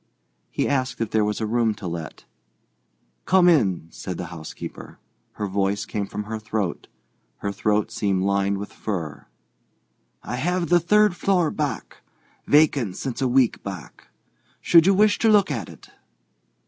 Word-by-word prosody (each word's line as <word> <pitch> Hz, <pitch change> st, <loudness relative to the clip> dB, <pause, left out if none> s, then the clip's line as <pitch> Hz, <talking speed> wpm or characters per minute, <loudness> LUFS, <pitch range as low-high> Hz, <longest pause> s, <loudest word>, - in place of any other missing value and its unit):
He -, -, -1 dB
asked 130 Hz, -2 st, -1 dB
if 115 Hz, -2 st, -2 dB
there 110 Hz, -1 st, +2 dB
was 105 Hz, 0 st, -1 dB
a 110 Hz, -, -1 dB
room 115 Hz, -1 st, +1 dB
to 100 Hz, -, -10 dB
let. 85 Hz, -2 st, -6 dB, 1.0 s
"Come 185 Hz, -1 st, +5 dB
in," 100 Hz, -, +3 dB
said 90 Hz, -2 st, -6 dB
the 90 Hz, -, -4 dB
housekeeper. 80 Hz, -2 st, -9 dB, 0.4 s
Her 105 Hz, -, -4 dB
voice 100 Hz, +1 st, -1 dB
came 100 Hz, -2 st, -3 dB
from 105 Hz, -, -5 dB
her 110 Hz, +1 st, -5 dB
throat; 105 Hz, -4 st, -3 dB, 0.5 s
her 100 Hz, -, -3 dB
throat 105 Hz, +2 st, 0 dB
seemed 100 Hz, -4 st, 0 dB
lined 100 Hz, 0 st, +1 dB
with 100 Hz, +1 st, -7 dB
fur. 80 Hz, -9 st, -5 dB, 1.0 s
"I 125 Hz, -, -4 dB
have 175 Hz, +4 st, -1 dB
the 175 Hz, 0 st, +5 dB
third 210 Hz, +2 st, +3 dB
floor 180 Hz, -2 st, +1 dB
back, 145 Hz, -8 st, -4 dB, 0.5 s
vacant 140 Hz, -10 st, +3 dB
since 130 Hz, -2 st, -4 dB
a 130 Hz, -, +2 dB
week 125 Hz, -1 st, +2 dB
back. 95 Hz, -6 st, -9 dB, 0.5 s
Should 170 Hz, 0 st, +5 dB
you 195 Hz, -, +5 dB
wish 210 Hz, +1 st, +4 dB
to 225 Hz, -, +3 dB
look 205 Hz, -6 st, +4 dB
at 115 Hz, -7 st, -4 dB
it?" -, -, -15 dB
110 Hz, 160 wpm, -23 LUFS, 100-155 Hz, 1.0 s, Come